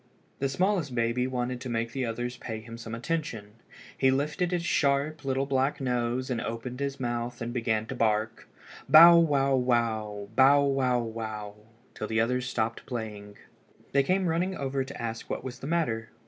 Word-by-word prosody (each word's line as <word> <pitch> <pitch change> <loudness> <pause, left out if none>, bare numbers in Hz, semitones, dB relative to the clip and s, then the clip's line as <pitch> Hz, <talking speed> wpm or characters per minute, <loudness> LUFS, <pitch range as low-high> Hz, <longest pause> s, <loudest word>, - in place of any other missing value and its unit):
The 135 - 0
smallest 175 -3 0
baby 120 +2 +1
wanted 125 -1 -3
to 130 - -5
make 115 0 -2
the 130 -2 -2
others 120 +2 -3
pay 110 -2 -5
him 115 +1 -10
some 115 -1 -7
attention. 115 -6 -4 0.4
He 130 - +3
lifted 150 +7 0
his 175 -1 -1
sharp 145 0 +1
little 135 0 0
black 135 +1 0
nose 125 0 -1
and 120 - -1
opened 120 +2 -5
his 140 -1 -3
mouth 120 -1 -3
and 120 0 -4
began 110 -3 0
to 120 - -6
bark—bow 125 +9 +4
wow 140 -4 +2
wow, 110 -5 0
bow 140 +2 +6
wow 135 -3 +2
wow—till 110 0 -7
the 110 0 0
others 125 +2 0
stopped 110 -1 -2
playing. 105 -4 -6 0.5
They 140 - +4
came 185 +7 +1
running 180 +3 0
over 135 0 -1
to 135 +1 -9
ask 115 -1 -5
what - - -3
was 125 -1 -7
the 135 - -6
matter. 120 -9 -1
125 Hz, 170 wpm, -28 LUFS, 115-140 Hz, 0.5 s, bow